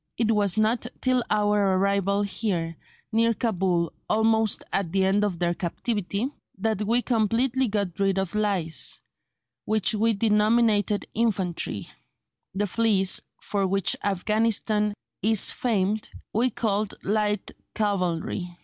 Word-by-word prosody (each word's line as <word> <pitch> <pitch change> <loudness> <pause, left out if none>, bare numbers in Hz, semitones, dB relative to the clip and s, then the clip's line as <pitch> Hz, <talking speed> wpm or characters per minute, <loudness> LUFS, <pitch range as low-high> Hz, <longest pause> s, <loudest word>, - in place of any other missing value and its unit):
It 225 -1 +2
was 205 -3 +2
not 220 +2 +1
till 255 -1 +2
our 205 -2 +2
arrival 200 +1 +1
here 185 -5 -2 0.4
(near 230 +1 +3
Cabul, 180 -7 0 0.2
almost 220 0 +2
at 190 -4 0
the 190 0 +2
end 200 +2 +2
of 200 -4 -1
their 175 0 +1
captivity) 200 +5 -2 0.3
that 210 0 -1
we 240 +2 +2
completely 245 +3 +1
got 200 -5 -2
rid 195 -1 +2
of 190 -3 -1
lice, 200 -6 0 0.7
which 215 -1 +1
we 225 +2 +2
denominated 210 0 +2
infantry; 185 - -1 0.7
the 205 +2 +1
fleas, 205 -2 +2 0.2
for 200 -2 0
which 195 0 +1
Afghanistan 210 +1 +1 0.3
is 220 -1 +3
famed, 215 -3 0 0.2
we 240 +4 +2
called 210 -3 -1
light 210 0 0 0.2
cavalry." 180 -3 -1
205 Hz, 120 wpm, -25 LUFS, 190-220 Hz, 0.7 s, near